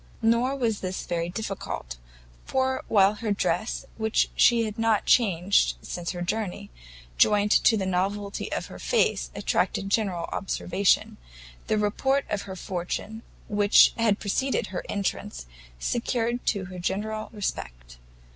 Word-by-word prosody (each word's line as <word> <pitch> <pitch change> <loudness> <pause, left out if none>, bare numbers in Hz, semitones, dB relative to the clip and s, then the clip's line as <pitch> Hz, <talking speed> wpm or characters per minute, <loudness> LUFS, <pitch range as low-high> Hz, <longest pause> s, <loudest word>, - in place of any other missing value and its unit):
Nor 235 +4 +3
was 230 -6 0
this 185 0 -4
very 170 0 -2
difficult; 185 - -5 0.5
for 260 0 0
while 200 -1 +5
her 215 0 -3
dress, 210 +2 -1
which 220 0 +1
she 235 -1 +5
had 215 0 -5
not 225 -2 +2
changed 185 - +3
since 175 -1 -5
her 175 -2 -3
journey, 190 - -3 0.5
joined 210 0 +4
to 225 - +5
the 195 - -1
novelty 200 +2 -2
of - - -2
her - - -11
face, 485 - +1
attracted 195 0 0
general 190 -6 0
observation, 190 0 0 0.5
the 215 - +1
report 265 +7 +1
of 205 - 0
her 190 - -5
fortune, 190 +5 -4 0.3
which 205 -1 +5
had 220 -3 +2
preceded 260 +6 -1
her - - -3
entrance, 125 - -3 0.3
secured 240 - -1
to 200 -4 0
her 180 0 -8
general 215 +4 -3
respect. - - -5
205 Hz, 135 wpm, -26 LUFS, 185-225 Hz, 0.5 s, while